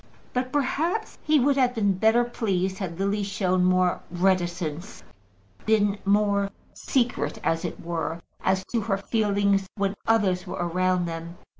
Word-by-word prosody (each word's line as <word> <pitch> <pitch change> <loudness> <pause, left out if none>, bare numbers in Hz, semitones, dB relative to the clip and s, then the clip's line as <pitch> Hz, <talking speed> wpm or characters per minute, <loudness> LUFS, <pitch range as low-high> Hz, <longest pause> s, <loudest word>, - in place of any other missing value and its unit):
But 255 0 -1
perhaps 320 - -1
he 305 -1 +3
would 275 +2 +3
have 250 -2 +2
been 205 -3 +2
better 220 +5 +3
pleased 190 -6 -1
had 175 -4 -4
Lily 200 +2 0
shown 190 -2 0
more 185 0 +2
reticence, 175 0 -1 0.6
been 205 -2 +2
more 200 0 +2 0.2
secret, 245 -2 -1
as 165 0 0
it - - -4
were, 165 -1 -3 0.2
as 190 0 +1
to 235 - +1
her 200 -2 0
feelings, 200 -2 +1
when 200 -1 0
others 195 -5 +2
were - - -4
around 180 +1 +1
them. 165 0 -6
195 Hz, 145 wpm, -25 LUFS, 180-220 Hz, 0.6 s, he